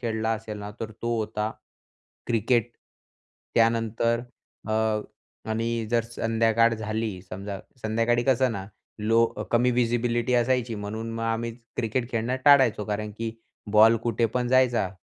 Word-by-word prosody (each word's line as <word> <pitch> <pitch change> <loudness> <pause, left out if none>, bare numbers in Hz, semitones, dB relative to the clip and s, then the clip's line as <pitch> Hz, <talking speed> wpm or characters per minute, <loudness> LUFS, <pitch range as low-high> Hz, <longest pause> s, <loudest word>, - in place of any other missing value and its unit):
खेळला 110 -2 -1
असेल 110 -1 -5
ना, 105 0 -6
तर 110 -1 -4
तो 120 0 0
होता 110 0 -2 0.8
क्रिकेट. 120 +1 +1 0.8
त्यानंतर 115 0 +2 0.5
अ, - - 0 0.8
आणि 115 0 -1
जर 120 -1 +3
संध्याकाळ 115 0 +2
झाली 110 -3 -3
समजा, 100 +2 -6 0.2
संध्याकाळी 115 +2 +1
कसं 130 -2 +3
ना 95 -3 -5 0.3
लो 115 +2 +4 0.3
कमी 120 +1 +3
व्हिजिबिलिटी 120 0 +1
असायची, 120 -1 +1
म्हणून 110 +2 -5
मग 115 - -4
आम्ही 115 +1 -1 0.2
क्रिकेट 120 +1 -1
खेळणं 115 +2 -1
टाळायचो. 135 -7 +6
कारण 105 0 -3
की 115 0 -2 0.4
बॉल 110 +2 +7
कुठे 115 0 +1
पण 120 +2 -2
जायचा 125 -5 +3
115 Hz, 130 wpm, -26 LUFS, 110-120 Hz, 0.8 s, बॉल